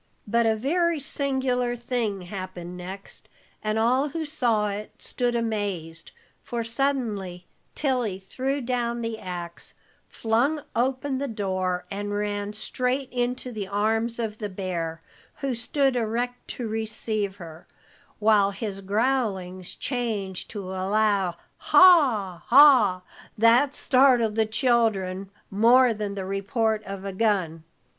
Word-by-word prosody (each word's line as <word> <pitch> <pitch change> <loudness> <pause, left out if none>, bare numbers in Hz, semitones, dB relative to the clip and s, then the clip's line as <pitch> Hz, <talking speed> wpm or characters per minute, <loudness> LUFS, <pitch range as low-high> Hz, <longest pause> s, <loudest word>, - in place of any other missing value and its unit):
But 230 +2 +2
a 220 - +3
very 330 +7 +1
singular 260 -3 -1
thing 235 -5 -2
happened 180 -1 -7
next, 190 +2 -8 0.3
and 215 0 0
all 255 +6 +2
who 320 +3 -4
saw 235 -8 +1
it 205 +1 -7
stood 245 -1 -1
amazed, 200 -8 -3 0.3
for 235 -1 -3
suddenly 225 -8 -2 0.3
Tilly 250 -9 0
threw 265 +9 -3
down 240 -1 -1
the 230 -1 -4
ax, 175 -2 -7 0.3
flung 250 +7 0
open 260 +3 0
the 280 - -2
door, 185 -5 -2
and 205 +1 -3
ran 205 0 -2
straight 255 +4 -1
into 250 +1 -2
the 210 -4 -5
arms 225 +3 0
of 220 -2 -4
the 210 -2 -3
bear, 170 -4 -4 0.3
who 275 -2 -2
stood 265 +3 +1
erect 245 +2 -2
to 240 - -5
receive 215 -2 -2
her, 165 -4 -11 0.5
while 210 -2 +4
his 200 0 -5
growlings 195 -4 -1
changed 220 -8 -3
to 195 -4 -6
a 190 0 -4
loud 200 -4 +2 0.2
"Haw, 255 - +5
haw!" 260 -9 +7 0.4
that 240 +6 +4
startled 255 -4 +4
the 220 0 +1
children 215 -6 +1 0.2
more 235 +4 +5
than 205 -2 -4
the 195 -1 -4
report 215 +3 -1
of 195 0 -7
a 195 - -4
gun. 185 -6 0
220 Hz, 130 wpm, -25 LUFS, 195-250 Hz, 0.5 s, haw